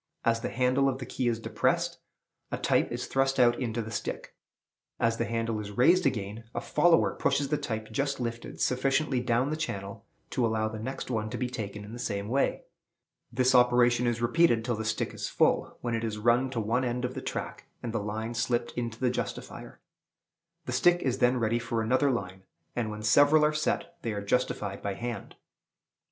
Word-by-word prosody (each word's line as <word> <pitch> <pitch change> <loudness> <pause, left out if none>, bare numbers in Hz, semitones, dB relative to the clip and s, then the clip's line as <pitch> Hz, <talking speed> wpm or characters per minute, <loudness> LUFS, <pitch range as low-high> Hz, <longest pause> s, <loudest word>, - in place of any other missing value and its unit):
As 115 0 +3
the - - -3
handle 130 +2 +2
of 130 - -2
the 130 - -6
key 125 0 -2
is 115 -1 +1
depressed, 115 - 0 0.5
a - - -1
type - - +1
is - - -3
thrust 135 0 +1
out 120 -1 +5
into 115 -2 -2
the 110 - -8
stick. 115 - -4 0.7
As 115 0 +2
the 115 - 0
handle 115 -1 -1
is 105 -1 -5
raised 180 +9 +5
again, 105 +1 -3
a - - 0
"follower" 175 -1 +3
pushes 140 -1 0
the 150 - +1
type 110 -6 -4
just 140 +3 -1
lifted 115 -1 -5
sufficiently 135 +1 +1
down 125 +3 +1
the - - 0
channel 100 -11 -5 0.2
to 125 - 0
allow 110 -1 +1
the 110 0 -6
next 130 +3 -5
one 110 -2 -1
to - - -4
be 125 -1 -2
taken 105 -3 -5
in 105 - -10
the 120 - -7
same 100 -2 -3
way. 135 +3 +1 0.7
This 130 +2 +2
operation 125 -1 +4
is 120 0 -1
repeated 120 -3 +3
till 120 -2 0
the 110 0 -4
stick 110 - -1
is - - -4
full, - - +1
when 120 -1 -2
it 115 0 -1
is 110 -2 -2
run 120 +4 +3
to 125 -3 -3
one 115 +4 0
end 125 0 -1
of 125 - -3
the - - -5
track, - - -5 0.2
and 115 -2 -4
the 115 - 0
line 110 +3 -4
slipped 120 0 0
into 115 -2 -4
the 125 -2 +2
justifier. 125 -1 -6 0.8
The - - -4
stick 175 0 +4
is 130 0 0
then 125 +1 +3
ready 115 0 +1
for 115 -1 -2
another 130 +5 +3
line; 95 -7 -3 0.3
and, 115 -3 -1
when 105 0 -6
several 145 +7 +5
are 150 - +2
set, 170 +2 -1
they 115 - -2
are 100 -1 -4
justified 100 -3 -1
by 100 -1 -3
hand. 120 -1 -5
120 Hz, 205 wpm, -29 LUFS, 110-130 Hz, 0.8 s, out